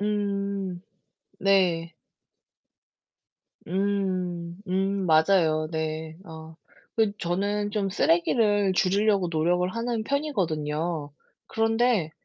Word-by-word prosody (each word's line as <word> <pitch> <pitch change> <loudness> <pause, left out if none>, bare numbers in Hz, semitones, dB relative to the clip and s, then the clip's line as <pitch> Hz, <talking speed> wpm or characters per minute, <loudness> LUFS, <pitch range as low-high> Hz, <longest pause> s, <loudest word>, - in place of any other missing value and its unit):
음. 200 -3 -2 0.6
네. 175 -4 +2 1.7
음. 185 -3 -1
음, 195 0 0
맞아요. 155 -1 +3
네. 160 0 -3
어 160 -2 -11 0.4
그 215 -2 +2
저는 205 +4 -1
좀 200 -2 -1
쓰레기를 200 +3 +2
줄이려고 195 0 +2
노력을 175 +3 +1
하는 230 -1 -2
편이거든요. 165 - -2 0.3
그런데 225 -6 +1
190 Hz, 165 characters per minute, -26 LUFS, 165-205 Hz, 1.7 s, 맞아요